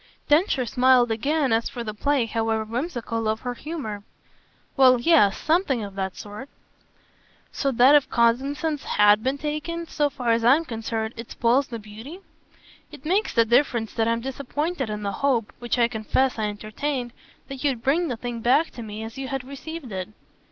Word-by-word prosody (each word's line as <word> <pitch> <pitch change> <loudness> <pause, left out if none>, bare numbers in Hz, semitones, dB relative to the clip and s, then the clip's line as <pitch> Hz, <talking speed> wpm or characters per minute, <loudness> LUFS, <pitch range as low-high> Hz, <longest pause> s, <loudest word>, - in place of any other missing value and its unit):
Densher 295 -4 +3
smiled 250 0 +4
again 275 +3 +1
as 225 +1 +1
for 240 - -6
the 215 -2 -5
play, 275 +3 +1
however 225 -1 -1
whimsical, 230 -2 -3
of 220 +1 -1
her 245 -1 -3
humour. 245 -7 -6 0.7
"Well 255 -2 +6
yes 240 -8 +4
something 310 - +1
of 200 -1 -7
that 190 -1 -3
sort." 210 +6 -9 1.0
"So 275 - -1
that 250 +4 +6
if 290 -2 +4
cognisance 275 +6 +1
HAS 210 0 +4
been 260 +5 -1
taken 305 +3 -4
so 295 -2 0
far 250 -4 -1
as 230 0 +2
I'm 275 +8 +5
concerned 225 -2 -3
it 230 0 -8
spoils 250 +4 +2
the 235 - -6
beauty?" 220 - -10 0.7
"It 275 - -13
makes 385 +7 +1
the 230 -1 +5
difference 235 -2 +2
that 225 0 0
I'm 230 0 0
disappointed 280 +2 -3
in 210 0 -4
the 200 - -1
hope 250 -6 +1
which 240 +1 -2
I 235 -1 +4
confess 235 +3 0
I 215 - 0
entertained 240 +5 -4 0.3
that 270 0 -7
you'd 260 -5 0
bring 330 +6 +2
the 245 -5 -3
thing 240 0 -5
back 255 +8 +2
to 240 - -9
me 215 0 -7
as 225 +4 -8
you 270 - -4
had 270 -1 -3
received 280 0 -8
it." 185 0 -4
245 Hz, 180 wpm, -24 LUFS, 225-280 Hz, 1.0 s, Well